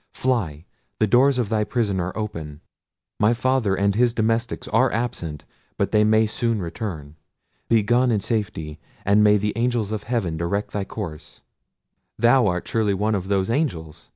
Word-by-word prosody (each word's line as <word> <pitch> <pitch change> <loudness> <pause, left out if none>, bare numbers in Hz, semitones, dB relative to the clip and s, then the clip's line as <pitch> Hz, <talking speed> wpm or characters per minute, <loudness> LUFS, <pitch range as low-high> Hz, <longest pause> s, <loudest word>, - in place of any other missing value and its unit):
Fly; 90 - -1 0.3
the 110 - +3
doors 130 +5 +4
of 120 -5 -1
thy 110 -1 +1
prison 105 -4 -1
are 90 +3 -3
open: 80 -9 -5 0.6
my 110 +3 +3
father 125 -5 +1
and 100 +1 +1
his 120 +2 +2
domestics 115 +2 -1
are 120 +4 +3
absent; 85 -10 -3 0.3
but - - 0
they 105 -1 +4
may 110 +1 +4
soon 115 0 -1
return. 85 -5 -6 0.5
Be 115 -2 +4
gone 120 +4 +3
in 110 -3 +2
safety; 90 -9 -3 0.3
and 105 +2 +4
may 105 0 +5
the 105 +1 -1
angels 115 -3 0
of 110 -1 -4
heaven 110 -10 -1
direct 95 +5 -2
thy 100 -2 -3
course!" 85 -8 -8 0.7
"Thou 120 0 +4
art 90 -2 -2
surely 105 -3 +1
one 105 +3 0
of 95 -2 -2
those 100 +1 0
angels!" 85 - -3
105 Hz, 170 wpm, -23 LUFS, 95-115 Hz, 0.7 s, may